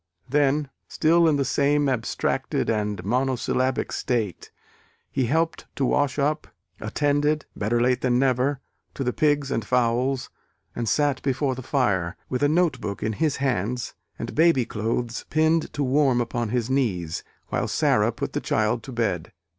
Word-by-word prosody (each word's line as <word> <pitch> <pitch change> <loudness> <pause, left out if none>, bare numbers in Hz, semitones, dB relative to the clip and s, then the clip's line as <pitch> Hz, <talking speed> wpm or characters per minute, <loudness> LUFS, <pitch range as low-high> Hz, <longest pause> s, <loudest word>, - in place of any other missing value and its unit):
Then 145 +1 +1 0.2
still 165 +1 +3
in 155 - +3
the 140 -1 +1
same 145 +2 +2
abstracted 120 -3 -1
and 105 -4 -2
monosyllabic 130 +2 0
state, 110 -8 -2 0.6
he 130 -3 0
helped 160 +5 0
to 135 - 0
wash 145 0 +1
up, 150 +2 0 0.3
attended 145 +1 0
better 110 +3 0
late 125 +1 +2
than 125 -1 +2
never 130 +1 +1 0.3
to 135 - -2
the 125 -1 -1
pigs 145 -2 +1
and 115 - 0
fowls, 125 +3 0 0.4
and 115 -2 -1
sat 145 +4 +1
before 135 0 0
the 130 - -6
fire, 100 - 0
with 125 - -2
a 145 - +4
note 160 -6 +2
book 100 -1 -4
in 110 - 0
his 150 +5 0
hands 125 -2 -1 0.2
and 115 +1 -5
baby 160 -6 +4
clothes 115 +2 -3
pinned 160 +1 +2
to 145 - -1
warm 135 -1 +3
upon 120 -1 -2
his 120 0 0
knees, 100 - -1 0.3
while - - -1
Sara - - +2
put - - -5
the - - -1
child 110 +2 +1
to 135 - -9
bed. 110 -9 -1
130 Hz, 160 wpm, -24 LUFS, 115-145 Hz, 0.6 s, a